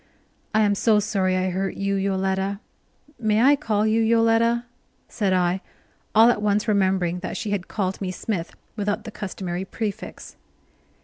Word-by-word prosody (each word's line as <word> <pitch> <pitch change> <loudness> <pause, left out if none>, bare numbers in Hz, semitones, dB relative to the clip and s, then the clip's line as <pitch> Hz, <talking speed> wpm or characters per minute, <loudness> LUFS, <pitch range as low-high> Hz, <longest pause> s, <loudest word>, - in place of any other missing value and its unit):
"I 220 - +5
am 205 -1 +3
so 210 +1 +3
sorry 190 -3 0
I 185 0 0
hurt 190 +1 -2
you, 200 0 -1
Yoletta 195 0 -1 0.6
may 215 -2 +2
I 280 +2 +6
call 215 -5 0
you 220 +1 +2
Yoletta?" 230 +1 +3 0.4
said 200 -3 -1
I, 180 0 +1 0.5
all 225 +2 +7
at 210 - -2
once 210 +1 +1
remembering 190 -4 +1
that 185 - -5
she 215 - -3
had 195 -3 -2
called 190 -2 -2
me 190 - -2
Smith, 185 -2 -4 0.2
without 205 0 -2
the 220 - -8
customary 190 -3 -4
prefix. 215 +2 -6
200 Hz, 160 wpm, -24 LUFS, 190-220 Hz, 0.6 s, all